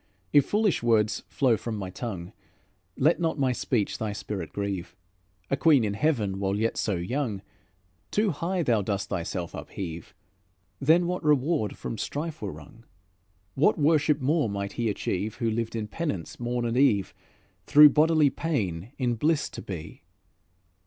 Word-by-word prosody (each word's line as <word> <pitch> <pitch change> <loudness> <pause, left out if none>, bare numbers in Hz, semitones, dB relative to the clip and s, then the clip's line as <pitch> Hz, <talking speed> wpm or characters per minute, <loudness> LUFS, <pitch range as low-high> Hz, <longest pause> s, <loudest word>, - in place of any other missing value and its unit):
If 145 -2 +5
foolish 210 -3 +1
words 110 -2 +2
flow 130 -4 +2
from 110 +1 -4
my 95 -2 -5
tongue, 95 -5 -6 0.6
Let 155 +6 +3
not 165 -2 0
my 135 -3 +2
speech 120 -3 -1
thy 110 -2 -2
spirit 100 -4 -5
grieve. 100 -3 -4 0.6
A - - +4
queen 145 -4 +4
in 105 -2 -1
heaven 105 -7 0
while 100 0 0
yet 110 +2 0
so 105 - 0
young, 105 +3 -2 0.7
Too 210 -1 +1
high 170 +4 -1
thou 115 -7 +2
dost 100 0 -2
thyself 85 0 -3
upheave. 85 -4 -7 0.6
Then 160 +5 +4
what 180 +1 -2
reward 150 -4 +1
from 115 - -5
strife 155 +1 -4
were - - -3
wrung? 115 0 -14 0.7
What 155 +10 +3
worship 150 -1 +3
more 145 -2 +1
might 100 0 -3
he 115 -2 -1
achieve 105 +1 -2
Who 115 -1 -1
lived 115 +1 -2
in 110 -2 -3
penance 105 - -4
morn 120 0 -2
and 120 +1 -1
eve, 105 -8 +3 0.5
Through 150 0 +9
bodily 155 -1 +4
pain 110 - -2
in 125 -3 0
bliss 150 +6 +1
to 120 - -7
be? 85 -7 -8
120 Hz, 160 wpm, -27 LUFS, 100-150 Hz, 0.7 s, Through